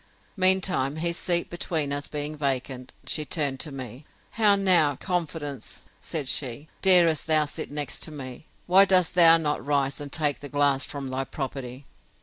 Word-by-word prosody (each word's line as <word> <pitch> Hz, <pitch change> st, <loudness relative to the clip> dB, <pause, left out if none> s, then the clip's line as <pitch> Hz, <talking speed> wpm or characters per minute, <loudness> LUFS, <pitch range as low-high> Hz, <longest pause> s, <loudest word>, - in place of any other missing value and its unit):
Mean 190 Hz, -1 st, +4 dB
time, 145 Hz, -7 st, -1 dB
his 170 Hz, +2 st, -1 dB
seat 175 Hz, 0 st, 0 dB
between 160 Hz, -4 st, -2 dB
us 145 Hz, 0 st, -3 dB
being 150 Hz, 0 st, -4 dB
vacant, 130 Hz, -3 st, -3 dB
she 155 Hz, -, -2 dB
turned 140 Hz, -2 st, -2 dB
to 155 Hz, -, -4 dB
me: 130 Hz, 0 st, -8 dB, 0.3 s
How 210 Hz, -3 st, +4 dB
now, 180 Hz, -7 st, +3 dB
confidence, 155 Hz, -, -4 dB
said 150 Hz, -5 st, -5 dB
she, 135 Hz, +3 st, -3 dB
darest 175 Hz, -5 st, +4 dB
thou 155 Hz, -1 st, +3 dB
sit 145 Hz, -, -6 dB
next 145 Hz, -1 st, -3 dB
me? 135 Hz, -2 st, -9 dB, 0.2 s
Why 190 Hz, +2 st, +6 dB
dost 185 Hz, -3 st, +3 dB
thou 165 Hz, -2 st, +7 dB
not 150 Hz, -4 st, -2 dB
rise, 140 Hz, -1 st, -1 dB
and 145 Hz, -1 st, -7 dB
take 150 Hz, -3 st, -1 dB
the 145 Hz, -, -9 dB
glass 145 Hz, -1 st, +1 dB
from 140 Hz, -2 st, -6 dB
thy 130 Hz, +1 st, -2 dB
property? 135 Hz, -1 st, -6 dB
150 Hz, 165 wpm, -25 LUFS, 135-170 Hz, 0.3 s, thou